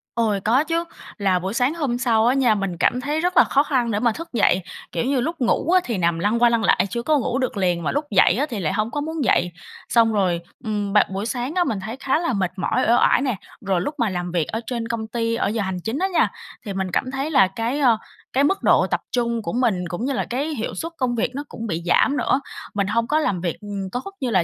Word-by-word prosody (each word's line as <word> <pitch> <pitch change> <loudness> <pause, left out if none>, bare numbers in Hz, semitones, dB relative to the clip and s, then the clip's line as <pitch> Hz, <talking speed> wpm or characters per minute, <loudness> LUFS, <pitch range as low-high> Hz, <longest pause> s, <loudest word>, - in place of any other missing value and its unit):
Ôi, 220 -4 +1
có 245 +8 +3
chứ, 330 +2 -1 0.3
là 195 -4 +2
buổi 190 +3 -4
sáng 250 +4 +1
hôm 285 -8 -1
sau 235 -3 +2
á 250 - +4
nha, 250 -5 +3
mình 195 -4 -3
cảm 250 +7 +1
thấy 295 +4 -1
rất 360 +1 0
là - - +9
khó 280 - +2
khăn 255 -6 0
để 205 - 0
mà 235 0 +2
thức 330 +8 -7
dậy. 200 -4 +3 0.3
Kiểu - - -1
như 265 -2 +1
lúc 330 +6 -2
ngủ 255 +7 +1
á 370 0 +5
thì 230 -4 -2
nằm 170 -2 +1
lăn 210 +6 +1
qua 240 - +6
lăn 230 -1 +1
lại - - +3
chưa 235 +2 -3
có 305 +2 +3
ngủ 255 -1 -1
được 255 -5 -2
liền, 175 -3 0
mà - - 0
lúc 290 +2 -1
dậy 185 -3 +5
á 290 - +2
thì 220 -4 -4
lại 155 -4 -1
hông 215 +2 -1
có 290 - -2
muốn 315 0 -3
dậy. 180 -7 +2 0.4
Xong 230 -2 +4
rồi, 185 -5 +1 0.2
ừm, 210 -3 -2
bạn 210 - +5
buổi 195 +2 -3
sáng 250 +6 -3
á 360 - +3
mình 220 - -2
thấy 220 +6 -6
khá 275 +3 +1
là 335 -7 -1
mệt 190 -3 0
mỏi, 185 - 0
uể 235 - +5
oải 245 - +4
nè. 255 -5 0 0.3
Rồi 185 -3 +1
lúc 295 +11 -3
mà 235 -6 +1
làm 180 -1 -3
việc 170 -4 0
ở 225 - -3
trên 235 -2 -3
công 230 -1 -3
ty 230 0 -1
ở 230 - 0
giờ 220 +1 -1
hành 190 -2 -2
chính 225 +4 -2
á 380 - +1
nha, 370 - +2 0.3
thì 200 - -4
mình 190 -1 -2
cảm 255 - -1
thấy 270 +3 -3
là 265 -10 +5
cái, 230 +8 -2
ơ, 245 -6 +4 0.4
cái 270 - +3
mức 385 +7 +1
độ - - +4
tập - - -1
trung 235 -2 0
của 170 - -4
mình 220 -8 +1
cũng 175 +8 -4
như 275 - -1
là - - -1
cái 265 +5 -1
hiệu 225 - -4
suất 330 +1 -4
công 245 -2 0
việc 230 - 0
nó 285 - -3
cũng 230 - -6
bị 170 -3 -3
giảm 280 +10 +3
nữa, 275 - +1 0.3
mình 200 -2 0
hông 230 +3 0
có 305 +2 +2
làm 200 - -1
việc, 170 -3 -2
ừm, 200 -2 -5
tốt 255 +11 -4
như 255 - 0
là 190 -6 +3
230 Hz, 280 wpm, -22 LUFS, 195-270 Hz, 0.4 s, là